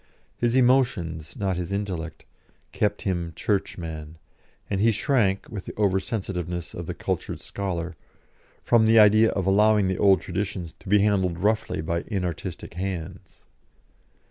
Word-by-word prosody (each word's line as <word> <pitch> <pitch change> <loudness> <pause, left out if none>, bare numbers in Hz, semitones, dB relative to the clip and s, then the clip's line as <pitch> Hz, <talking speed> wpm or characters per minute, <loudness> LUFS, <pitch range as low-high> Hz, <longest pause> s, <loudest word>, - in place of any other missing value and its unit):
His 120 0 0
emotions, 120 - +2
not 95 -3 -1
his 90 +1 -4
intellect, 95 -5 -4 0.5
kept 105 0 -1
him 85 -4 -2
Churchman, 80 -6 -3 0.5
and 100 -1 -1
he 115 +1 +5
shrank, 105 -4 +1
with 100 -4 -7
the - - -8
over 100 -3 +2
sensitiveness 90 -5 -4
of 85 - -6
the - - -4
cultured - - -3
scholar, 90 -3 -4 0.7
from 110 -2 +4
the 115 +1 +5
idea 110 +1 +7
of 95 - -2
allowing 105 +1 +4
the 95 - -2
old 95 -3 +5
traditions 90 -1 -4
to 95 - -11
be 105 0 +5
handled 95 -4 +2
roughly 105 -2 0
by 85 +2 -1
inartistic 90 -4 -4
hands. 95 0 -6
95 Hz, 145 wpm, -25 LUFS, 85-105 Hz, 0.7 s, idea